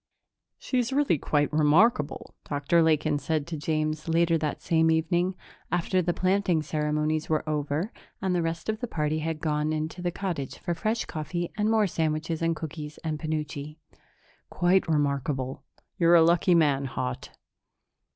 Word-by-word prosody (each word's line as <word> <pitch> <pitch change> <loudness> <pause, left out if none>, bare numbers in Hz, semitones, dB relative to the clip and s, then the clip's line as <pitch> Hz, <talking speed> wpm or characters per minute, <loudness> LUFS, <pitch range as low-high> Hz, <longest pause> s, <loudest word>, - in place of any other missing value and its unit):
"She's 250 -1 -1
really 270 - +2
quite 145 +1 0
remarkable," 155 +2 +3 0.2
Dr. 145 +4 +2
Lakin 155 -2 +2
said 150 +1 -1
to 170 - -5
James 155 0 -2
later 165 0 +3
that 155 -2 -2
same 160 -1 +3
evening, 175 +3 +1 0.4
after 180 +2 +1
the 175 0 0
planting 185 -3 +1
ceremonies 150 0 -1
were 155 0 0
over 150 +6 -1 0.3
and 190 -1 0
the 175 - +1
rest 165 0 -3
of 215 0 -1
the 245 - -3
party 155 -4 -1
had 160 0 -3
gone 150 -1 0
into 155 +3 -3
the 175 - 0
cottage 175 -7 -4
for 175 - -3
fresh 215 +6 -1
coffee 165 +3 -4
and 210 0 +1
more 220 -1 +3
sandwiches 160 -2 -1
and 165 0 +1
cookies 155 -1 -7
and 155 -2 -2
penuche. 150 -2 -4 0.7
"Quite 180 +1 +2
remarkable. 140 -3 -1 0.4
You're 170 0 +6
a 165 - +7
lucky 170 +2 +4
man, 145 -4 +3
Haut." 130 0 -4
160 Hz, 155 wpm, -27 LUFS, 150-175 Hz, 0.7 s, a